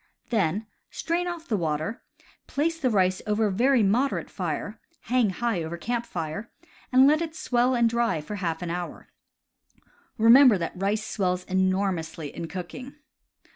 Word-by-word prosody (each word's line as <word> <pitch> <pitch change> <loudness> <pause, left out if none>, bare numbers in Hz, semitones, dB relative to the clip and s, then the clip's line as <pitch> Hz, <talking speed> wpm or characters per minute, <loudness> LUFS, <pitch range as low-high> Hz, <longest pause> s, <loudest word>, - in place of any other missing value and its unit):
Then 210 -1 +1 0.2
strain 345 +2 -2
off 340 -1 -5
the 225 - 0
water, 160 +3 -2 0.5
place 325 +3 -1
the 265 -5 +1
rice 185 -4 +2
over 210 +1 +2
a 205 - +1
very 245 +4 +3
moderate 240 +8 +1
fire - - -4 0.2
(hang 245 -3 +2
high 210 0 -1
over 165 +1 -5
camp 235 +6 -3
fire), 165 +6 -5 0.4
and 260 +1 +7
let 305 +3 +4
it 325 -1 -4
swell 250 -4 +1
and 235 -1 +4
dry 230 -7 +1
for 205 +8 -6
half 170 -3 -3
an 170 - -3
hour. 175 0 -6 1.1
Remember 235 +1 +7
that 170 -2 -3
rice 200 +3 -1
swells 180 -2 -1
enormously 185 -5 -1
in 165 - -5
cooking. 190 - -7
210 Hz, 155 wpm, -26 LUFS, 180-250 Hz, 1.1 s, and